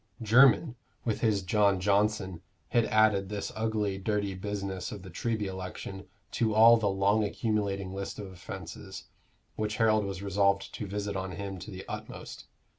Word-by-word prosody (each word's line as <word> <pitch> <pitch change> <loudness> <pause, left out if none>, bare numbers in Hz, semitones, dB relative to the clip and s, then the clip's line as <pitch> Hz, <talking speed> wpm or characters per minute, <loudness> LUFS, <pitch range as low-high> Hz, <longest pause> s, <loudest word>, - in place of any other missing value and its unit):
Jermyn, 125 +5 +5 0.3
with 110 -3 -1
his 105 -4 +2
John 100 0 +3
Johnson, 100 -2 +1 0.3
had 120 -2 +3
added 105 -3 +3
this 105 -1 -4
ugly, 110 -3 -1
dirty 100 -1 -1
business 95 -1 -4
of 100 -3 -8
the 95 - -10
Treby 110 +5 -2
election 95 0 -6 0.2
to 110 -2 0
all 115 +2 +8
the 105 -3 +1
long 100 +3 +2
accumulating 100 -3 -1
list 100 0 -5
of 105 - -6
offences, 95 +1 -8 0.5
which 105 0 -1
Harold 110 -2 +3
was 95 -1 -5
resolved 100 0 +1
to 105 - -5
visit 100 +1 -3
on 95 -1 -3
him 95 0 -5
to - - -9
the 95 -1 -8
utmost. - - -7
100 Hz, 160 wpm, -29 LUFS, 95-110 Hz, 0.5 s, all